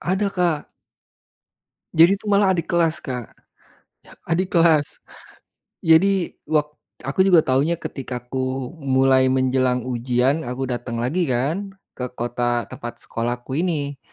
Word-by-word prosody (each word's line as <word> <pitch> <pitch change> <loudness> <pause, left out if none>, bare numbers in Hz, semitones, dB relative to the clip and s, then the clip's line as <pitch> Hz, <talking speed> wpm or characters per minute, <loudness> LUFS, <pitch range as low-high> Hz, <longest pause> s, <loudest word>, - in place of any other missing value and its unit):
Ada 190 +3 0
Kak. 175 -6 -1 1.2
Jadi 170 +5 +6
itu 200 - -19
malah 200 -2 +3
adik 170 - -3
kelas 170 -1 +1
Kak, 125 -4 -6 0.9
adik 180 +3 -1
kelas, 165 -4 +3 0.8
jadi 175 +3 +4 0.2
wak 150 -1 +1 0.3
aku 135 +7 -5
juga 175 -4 +6
tahunya 140 +6 +1
ketika 125 -3 -5
ku 130 -1 -2
mulai 130 -1 +3
menjelang 130 -1 +1
ujian 125 +3 0
aku 125 +2 -3
datang 120 -1 -4
lagi 165 +7 0
kan 160 +11 -1 0.2
ke 125 - -5
kota 120 0 -1
tempat 120 0 -8
sekolahku 120 +4 -3
ini, 145 -6 -2
135 Hz, 125 wpm, -22 LUFS, 125-170 Hz, 1.2 s, Jadi